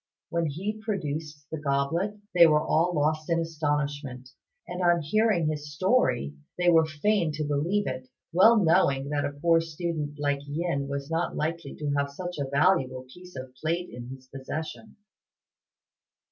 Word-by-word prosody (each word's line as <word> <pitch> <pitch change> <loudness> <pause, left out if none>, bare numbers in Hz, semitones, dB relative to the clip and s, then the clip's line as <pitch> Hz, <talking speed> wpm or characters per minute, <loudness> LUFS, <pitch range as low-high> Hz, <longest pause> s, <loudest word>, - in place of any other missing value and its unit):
When 170 -1 0
he 195 +9 -3
produced 155 -7 -4
the 160 - -3
goblet 150 +8 0 0.2
they 170 -2 +8
were 150 -1 +3
all 170 +3 +2
lost 155 +2 0
in 170 0 +2
astonishment; 145 -5 -2 0.4
and 180 +1 -4
on 175 -2 +3
hearing 210 +1 +2
his 150 -1 -3
story, 185 - +2 0.2
they 180 0 +4
were 160 -1 +5
fain 165 +2 +1
to 155 +1 -2
believe 155 +8 0
it, 130 0 -4 0.3
well 220 +7 +7
knowing 140 -7 +3
that 145 -1 0
a 140 - -2
poor 165 +1 +4
student 160 -2 -4
like 145 -1 +1
Yin 145 -2 -1
was 140 +2 -4
not 165 +1 -1
likely 160 -1 -3
to 150 -2 -3
have 140 0 +1
such 175 +3 -6
a 140 -1 -2
valuable 135 -4 +2
piece 180 0 -14
of 130 -1 -7
plate 170 +3 -1
in 120 0 -8
his 130 0 -10
possession. 155 +10 -6
155 Hz, 160 wpm, -27 LUFS, 140-175 Hz, 0.4 s, they